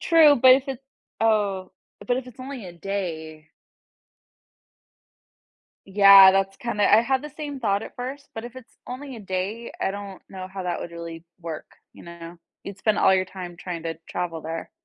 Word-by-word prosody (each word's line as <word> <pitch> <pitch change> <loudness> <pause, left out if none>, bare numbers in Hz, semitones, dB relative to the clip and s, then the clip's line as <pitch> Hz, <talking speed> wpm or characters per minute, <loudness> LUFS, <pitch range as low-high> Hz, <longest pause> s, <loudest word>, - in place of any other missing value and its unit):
Tr - - -6
True, 315 -4 +7
but 255 +1 +8
if 270 +2 +2
it 265 -2 -4 0.4
oh, 205 -4 +1 0.3
but 245 - +1
if 255 0 -4
it's 245 - -15
only 260 -4 -7
a 175 - -9
day. 160 -4 -5 2.4
Yeah, 195 -1 +9
that's 195 0 0
kinda 210 -4 +1
I 215 - +8
had 260 +3 0
the 300 - -7
same 290 -1 -6
thought 205 -4 0
at - - -10
first, 265 +3 -6
but 225 - -6
if 240 +1 -9
it's 255 -3 -14
only 260 +1 -7
a 225 - -9
day, 195 +4 -4
I - - +1
don't 200 -1 -8
know 185 -1 -7
how 190 0 -7
that 175 -1 -2
would 170 - -6
really 170 -1 -8 0.2
work, 165 -2 -6 0.3
you - - -13
know? 170 0 -10 0.2
You'd 200 -1 -8
spend 215 -2 +1
all 190 - +5
your 185 0 +2
time 180 -2 -9
trying 175 -2 -6
to 165 - -2
travel 170 -2 -4
there. 165 +1 -5
195 Hz, 190 wpm, -24 LUFS, 180-245 Hz, 2.4 s, Yeah